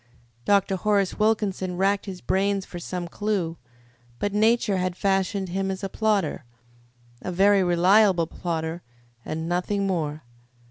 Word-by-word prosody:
Dr. 200 -1 +2
Horace 200 0 +1
Wilkinson 200 -4 0
racked 200 +2 +1
his 185 -2 -7
brains 195 0 0
for 175 - -8
some 175 0 -5
clue, 180 -3 -2 0.6
but 205 +7 -2
Nature 215 -1 +2
had 185 0 -2
fashioned 195 0 0
him 190 +2 -2
as 190 +1 -4
a 195 - -2
plodder 205 -9 0 0.8
a 185 - -4
very 195 +2 +4
reliable 180 +1 +4
plodder 165 0 -4 0.4
and 160 +1 -4
nothing 180 +3 -1
more. 155 -5 -2
190 Hz, 135 wpm, -25 LUFS, 175-200 Hz, 0.8 s, very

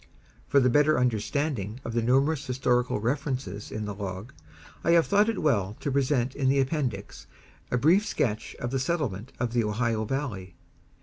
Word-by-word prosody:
For 140 - +4
the 125 - +3
better 150 +3 +4
understanding 120 -1 -1
of 115 - -4
the 120 - +1
numerous 135 +5 +2
historical 125 -2 +1
references 125 -4 -3
in 105 0 -4
the 105 - -4
Log, 100 +5 -6 0.5
I 170 - +3
have 170 -1 +5
thought 205 +2 +3
it 225 - -2
well 105 -9 +1
to 140 - -2
present 135 -2 +1
in 135 -2 +1
the 135 +1 +3
Appendix 130 -8 -2 0.4
a 125 - +1
brief 165 - +4
sketch 110 - -2
of 120 - -4
the 135 - 0
settlement 130 - -2
of 120 -1 -1
the 120 -1 +2
Ohio 110 +1 0
Valley. 105 -9 -4
125 Hz, 175 wpm, -27 LUFS, 110-140 Hz, 0.5 s, have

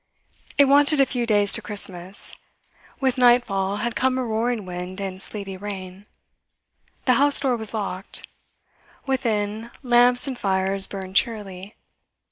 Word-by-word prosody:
It 285 - +7
wanted 285 +2 +4
a 275 - +6
few 245 -3 -3
days 205 -2 +2
to - - +2
Christmas; 190 -2 +1 0.6
with 260 -1 0
nightfall 210 -6 +2
had 240 - -3
come 260 0 +1
a 260 - -1
roaring 225 -1 -2
wind 180 +1 -6
and 190 -1 -5
sleety 195 -2 -4
rain; 195 0 -8 1.0
the 255 - +4
house 285 0 +3
door 265 -3 +1
was 220 -2 -3
locked; 195 -3 -2 0.8
within, 225 -4 -2
lamps 245 +1 +4
and 270 -2 -4
fires 195 0 0
burned 190 -1 -7
cheerily. 200 -4 -2
210 Hz, 135 wpm, -23 LUFS, 195-245 Hz, 1.0 s, It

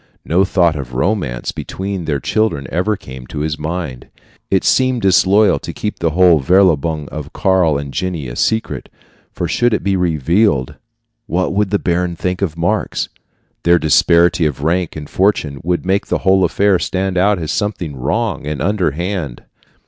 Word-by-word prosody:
No 90 +4 +3
thought 90 -4 +2
of 65 -4 -6
romance 75 - -1
between 95 -2 -5
their 75 -3 -1
children 110 - 0
had - - -11
ever 95 +5 0
come 65 - -12
into 65 +3 -7
his 75 0 -2
mind. 80 -5 -5 0.4
It 95 - +2
seemed 130 -2 +2
disloyal 100 +2 +4
to - - -7
keep 105 - -4
the 85 - +1
verlobung 80 -2 +3
of 75 -1 -7
Karl 90 -6 +2
and 70 -1 -6
Jenny 90 -7 -3
a - - -7
secret; 110 - -1 0.4
for - - -3
should 120 -2 +2
it - - -4
be 100 -1 +1
revealed, 85 - +1 0.5
what 90 -1 -1
would 105 0 +1
the 100 - +2
baron 90 -1 -1
think 90 +2 -3
of 85 -5 -2
Marx? 85 +1 -1 0.5
Their 85 +1 +4
disparity 85 +2 +3
of 70 -1 -5
rank 85 +2 0
and 75 -1 -7
fortune 80 -8 0
would 90 +2 -1
make 95 +2 0
the - - 0
whole 95 0 +4
affair 95 +2 +2
stand 95 +2 -2
out 100 +3 +3
as 80 -3 -3
something 95 -8 -2
wrong 80 - -2
and 75 -2 -3
underhand. 85 - -2
90 Hz, 170 wpm, -17 LUFS, 75-95 Hz, 0.5 s, disloyal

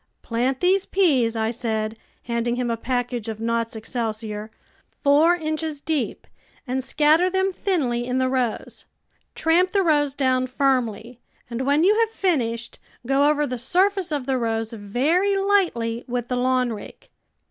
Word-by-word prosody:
" - - -50
Plant 250 +3 -1
these 375 +2 +2
peas," 270 - +2
I 220 0 0
said, 220 -2 -2 0.3
handing 235 0 -1
him 245 -1 -1
a - - 0
package 245 -1 -3
of 220 -1 -5
Nott's 230 0 -1
Excelsior, 220 -1 -4 0.3
" - - -38
four 300 +5 +5
inches 310 -2 -3
deep 295 -4 -2 0.4
and 260 0 -2
scatter 310 +6 +3
them 380 +1 0
thinly 255 -12 -1
in 250 0 -1
the 260 0 +2
rows. 255 -3 -2 0.5
Tram 335 +3 +3
J) - - -22
the 395 -1 +3
rows 290 -4 +2
down 255 -2 +1
firmly, 250 -3 -1 0.3
and 255 +3 -3
when 290 +3 +3
you 395 +4 +5
have 455 -1 +3
finished, 240 - -1 0.3
go 275 +3 +3
over 295 0 +2
the 250 -3 -4
surface 370 - +1
of 285 -4 -2
the 265 -1 0
rows 225 -1 -2
very 290 - +1
lightly 340 - +1
with 245 -1 -3
the 250 - 0
lawn 250 -1 +1
rake. 210 - -11
255 Hz, 165 wpm, -23 LUFS, 235-315 Hz, 0.5 s, four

